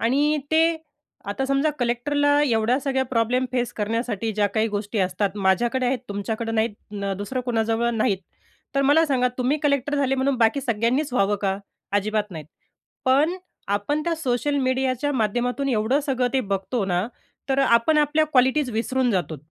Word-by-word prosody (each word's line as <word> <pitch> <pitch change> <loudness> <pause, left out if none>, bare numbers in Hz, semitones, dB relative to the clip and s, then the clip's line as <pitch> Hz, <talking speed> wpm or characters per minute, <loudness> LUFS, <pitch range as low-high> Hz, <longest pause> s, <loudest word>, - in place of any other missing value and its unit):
आणि 290 +6 +2
ते 320 +1 +5 0.7
आता 235 +7 -2
समजा 275 +3 +2
कलेक्टरला 285 +5 +1
एवढ्या 235 +1 +2
सगळ्या 265 -1 0
प्रॉब्लेम 250 +1 +1
फेस 245 -1 -1
करण्यासाठी 225 0 -2
ज्या 205 0 +2
काही 220 +3 0
गोष्टी 205 +1 -3
असतात 190 +2 0
माझ्याकडे 230 +6 +1
आहेत 255 +1 +1
तुमच्याकडे 220 +3 -3
नाहीत 210 -2 -3
अ, 195 - -1
दुसरं 230 +6 -3
कुणाजवळ 230 0 +1
नाहीत 205 -3 +1 0.6
तर 275 - +3
मला 290 +4 +5
सांगा 250 -3 +2
तुम्ही 255 +4 +1
कलेक्टर 280 0 +1
झाले 270 -2 +1
म्हणून, 265 0 +1
बाकी 230 +4 +3
सगळ्यांनीच 250 +3 0
व्हावं 205 -3 +2
का? 195 -1 +1 0.4
अजिबात 210 +1 0
नाहीत. 160 -5 -8 0.6
पण 290 +7 +3 0.3
आपण 205 +10 0
त्या 340 - 0
सोशल 285 -1 -1
मीडियाच्या 260 +1 0
माध्यमातून 245 +3 0
एवढं 240 +3 +1
सगळं 255 -2 +1
ते 265 - +2
बघतो 200 +1 -2
ना, 180 +2 0 0.4
तर 270 0 +1
आपण 265 +4 +4
आपल्या 300 +1 +3
क्वालिटीज 260 -1 +2
विसरून 245 +3 0
जातो 175 -6 -1
245 Hz, 160 wpm, -23 LUFS, 215-275 Hz, 0.7 s, ते